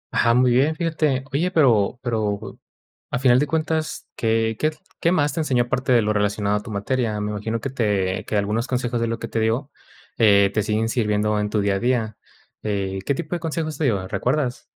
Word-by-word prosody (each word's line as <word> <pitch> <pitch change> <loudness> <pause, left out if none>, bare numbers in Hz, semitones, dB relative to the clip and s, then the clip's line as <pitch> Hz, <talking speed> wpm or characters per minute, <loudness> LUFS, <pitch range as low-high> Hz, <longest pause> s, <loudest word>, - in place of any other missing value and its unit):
Ajá, 115 0 +3
muy 125 0 +4
bien, 140 +6 +3
fíjate. 155 -5 0
Oye, 170 +6 +1
pero 125 - +3
pero, 110 -3 -2 0.5
a - - -1
final 125 -1 +5
de 150 - +1
cuentas, 160 0 -2
¿qué 110 -1 +1
qué 155 - +2
tl 155 - -18 0.2
qué 170 - +2
más 150 -4 +2
te - - -3
enseñó 125 -6 +1
parte 130 +1 -1
de 120 -3 +5
lo 105 +1 +1
relacionado 105 0 0
a 105 - -4
tu 120 - -9
materia? 110 +1 -1
Me 105 0 -2
imagino 110 +2 -3
que 135 - -4
te 100 -7 0
que 105 - -1
algunos 105 +5 0
consejos 120 -2 -1
de 115 - +1
lo 115 0 -2
que - - -5
te 115 - -2
dio, 115 +6 0 0.5
eh, 100 -3 +5
te 110 - +1
siguen 110 +1 0
sirviendo 105 -3 +1
en 105 0 -1
tu 105 -1 0
día 100 -1 +1
a 95 - -1
día. 120 -3 0 0.4
Eh, 95 -2 -2
¿qué 140 - +2
tipo 170 +3 -4
de - - -3
consejos 160 -2 -3
te 155 - +1
dio? 100 -7 0
¿Recuerdas? 125 +4 -1
115 Hz, 220 wpm, -22 LUFS, 105-135 Hz, 0.5 s, final